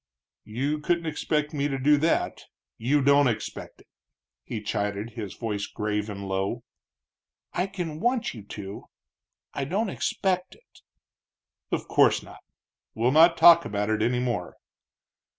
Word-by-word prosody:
"You 140 +7 -1
couldn't 170 +2 0
expect 150 -1 -1
me 145 -1 0
to 135 -2 -2
do 145 +3 +4
that 160 +3 0 0.3
you 135 +5 +2
don't 140 0 +5
expect 115 -3 -4
it," - - -24 0.6
he 115 - -5
chided, 105 +1 -3
his 110 -6 -7
voice 105 -4 -3
grave 105 0 -2
and 100 -1 -6
low. 95 +1 -2 0.9
"I 180 +2 0
can 175 -6 -5
want 240 +3 0
you 115 - -9
to 100 +1 -8
do 95 +1 -7
it - - -19 0.7
I 140 - -2
don't 195 +7 -1
expect 185 -1 -1
it." - - -24 0.9
"Of - - -2
course - - +4
not. - - -13 0.6
We'll 120 +3 +2
not 165 +3 +6
talk 170 0 +8
about 105 +1 -2
it 110 0 0
any 120 +3 +1
more." 120 -8 -3
135 Hz, 150 wpm, -26 LUFS, 105-160 Hz, 0.9 s, talk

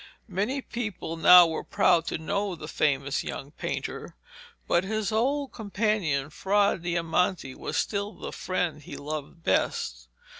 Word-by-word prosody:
Many 220 +8 -1
people 220 -8 -4
now 180 +2 +9
were 160 -1 -3
proud 170 -3 +3
to - - -1
know 200 +4 -2
the 155 - -9
famous 140 -3 0
young 140 +1 -6
painter, - - -5 0.5
but 175 - +3
his 215 +2 -2
old 270 +6 0
companion 200 - -1
Fra 200 +4 +2
Diamante 170 -3 0
was - - -4
still 200 0 -1
the - - -7
friend 180 -4 -2
he - - -8
loved 155 +2 -6
best. - - 0
180 Hz, 140 wpm, -27 LUFS, 160-205 Hz, 0.5 s, now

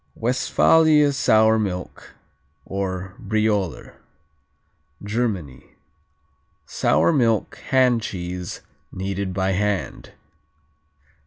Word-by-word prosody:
Westphalia 150 +5 +3
Sour 110 -3 +3
Milk, 90 -4 -5 0.5
or 95 -1 -4
Brioler 105 -5 -2 1.1
Germany 100 - -4 0.9
Sour 80 +4 +1
milk 115 -5 +1
hand 125 -3 +3
cheese, 90 -3 -6 0.3
kneaded 95 0 -4
by 95 0 -1
hand. 100 +1 -2
100 Hz, 70 wpm, -22 LUFS, 95-115 Hz, 1.1 s, Westphalia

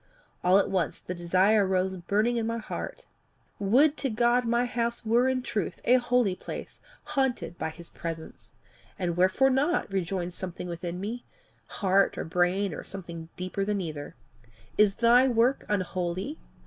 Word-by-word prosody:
All 180 +2 +5
at 200 - +3
once 180 -5 0
the 180 - -6
desire 185 +5 +3
arose 190 0 0
burning 210 +7 0
in 225 -1 -1
my 230 0 -1
heart: 225 - -6 0.5
Would 270 +10 +4
to 270 - -1
God 240 +2 +2
my 235 +1 +2
house 235 -1 -2
were 235 +3 +3
in 255 -1 -1
truth 215 -4 -3
a 250 +2 +6
holy 245 -5 +2
place, - - -8 0.2
haunted 265 - -1
by - - -1
his 165 +2 -12
presence! 165 -1 -7 0.5
'And 175 -4 -1
wherefore 190 +10 +4
not?' 280 - +1
rejoined 180 -1 -2
something 180 0 -6
within 175 +1 -5
me 225 +5 -4 0.4
heart 195 -1 +2
or - - -2
brain 180 +3 +1
or - - -6
something 170 -4 -7
deeper 185 +2 -2
than 205 0 0
either. 155 -5 -6 0.6
'Is 210 -2 +4
thy 240 +2 +5
work 245 +2 +2
unholy? 185 - -2
200 Hz, 160 wpm, -28 LUFS, 180-240 Hz, 0.6 s, a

